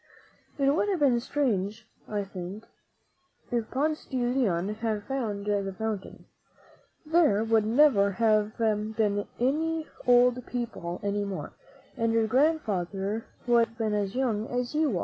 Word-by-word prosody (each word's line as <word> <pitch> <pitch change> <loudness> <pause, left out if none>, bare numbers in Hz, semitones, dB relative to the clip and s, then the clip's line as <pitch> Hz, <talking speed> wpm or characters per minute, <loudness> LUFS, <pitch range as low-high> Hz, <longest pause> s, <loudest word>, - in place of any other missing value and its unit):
It 275 -1 +3
would 410 - +1
have 380 -4 0
been 285 -3 +4
very 240 - +2
strange, 220 -6 -1 0.2
I 205 -1 -2
think, 195 +2 -7 0.9
if 235 -2 -1
Ponce 305 +3 -1
de 260 - -4
Leon 240 -8 +1
had 215 -1 -2
found 210 -5 -3
the 200 -2 -1
fountain. 220 -3 -4 0.8
There 305 -10 +3
would 225 -1 +2
never 225 -6 +4
have 215 0 +2
been 215 -2 0
any 315 +5 0 0.2
old 245 0 +5
people 230 -8 -4
any 205 0 0
more, 200 -2 -5 0.4
and 230 0 0
your 225 -1 +3
grand 300 +8 +3
father 195 +1 -3 0.2
would 235 -2 +4
have 230 - -22
been 220 -3 -1
as 205 0 -1
young 230 -4 0
as 245 +1 -2
you 300 - +1
are. - - -1
225 Hz, 150 wpm, -28 LUFS, 205-255 Hz, 0.9 s, old